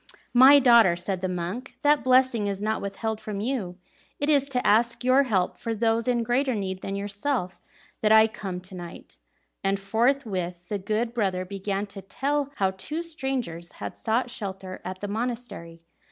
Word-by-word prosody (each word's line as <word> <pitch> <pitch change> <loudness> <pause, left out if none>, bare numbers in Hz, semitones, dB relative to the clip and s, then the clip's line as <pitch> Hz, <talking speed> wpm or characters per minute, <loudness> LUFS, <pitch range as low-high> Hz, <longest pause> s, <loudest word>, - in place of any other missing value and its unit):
"My 260 +3 +9
daughter," 235 -9 +6
said 180 +1 -3
the 185 - -1
monk, 180 +9 -5
"that 295 0 +4
blessing 255 -4 +3
is 200 -1 -2
not 215 +1 -1
withheld 215 +2 -3
from 210 -2 -5
you. 210 -6 -3 0.4
It 290 +2 +1
is 280 -1 +3
to 250 -2 -1
ask 235 +3 +3
your 255 +2 +5
help 200 -9 0
for 230 -1 -3
those 225 +2 +1
in 240 -2 +2
greater 250 +2 +1
need 190 -2 -3
than 195 - -4
yourself 200 0 -3 0.4
that 215 - +3
I 220 0 +8
am 220 - +1
come 190 -4 -6
to 185 +1 -10
night." 175 -2 -10 0.5
And 195 0 +1
forthwith 195 -5 -1
the 205 - -2
good 215 +4 -1
brother 190 -6 -1
began 195 +1 -3
to 200 -1 -10
tell 275 +9 -1
how 190 -1 +1
two 300 - -4
strangers 265 - -4
had - - -7
sought 235 +2 -1
shelter 190 -5 -6
at 185 +1 -6
the 205 - -3
monastery. 220 -7 -5
215 Hz, 180 wpm, -26 LUFS, 190-250 Hz, 0.5 s, My